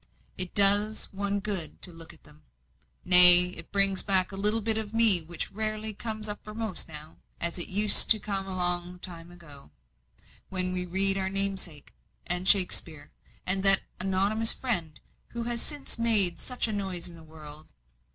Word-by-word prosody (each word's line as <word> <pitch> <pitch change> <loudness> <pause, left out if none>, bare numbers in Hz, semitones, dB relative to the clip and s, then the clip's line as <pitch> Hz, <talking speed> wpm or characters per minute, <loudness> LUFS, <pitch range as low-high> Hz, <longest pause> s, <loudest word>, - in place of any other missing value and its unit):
It 185 -1 -5
does 205 +2 +1
one 200 +1 -7
good 195 -6 -6
to 180 - -6
look 165 0 -14
at 165 - -22
them. 150 +1 -23 0.6
Nay, 180 0 +11
it 180 - -12
brings 195 -1 -2
back 190 -2 -3
a - - -11
little 210 +3 0
bit 220 +1 -5
of 220 0 -12
me 220 -6 +4
which 165 +1 -10
rarely 215 0 -8
comes 215 0 -9
uppermost 215 -1 -6
now, 155 0 -14 0.2
as 170 +1 -6
it 175 - 0
used 205 +2 +5
to 220 - +4
come 195 -2 -8
long 180 -1 -7
ago, 165 - -17 0.8
when 185 -1 -5
we 180 0 -4
read 195 +2 +3
your 190 -1 -6
namesake, 195 -6 -7 0.3
and 180 +1 -4
Shakspeare, 165 -6 -2 0.3
and 190 +1 -3
that 195 0 +3 0.2
Anonymous 195 +4 -3
Friend 175 - -8 0.3
who 235 0 -9
has 235 0 -7
since 290 -5 -7
made 215 -6 +2
such 250 -2 -5
a 220 - -9
noise 190 -4 -8
in 175 - -15
the 165 - -18
world. 155 -1 -16
190 Hz, 165 wpm, -22 LUFS, 175-210 Hz, 0.8 s, Nay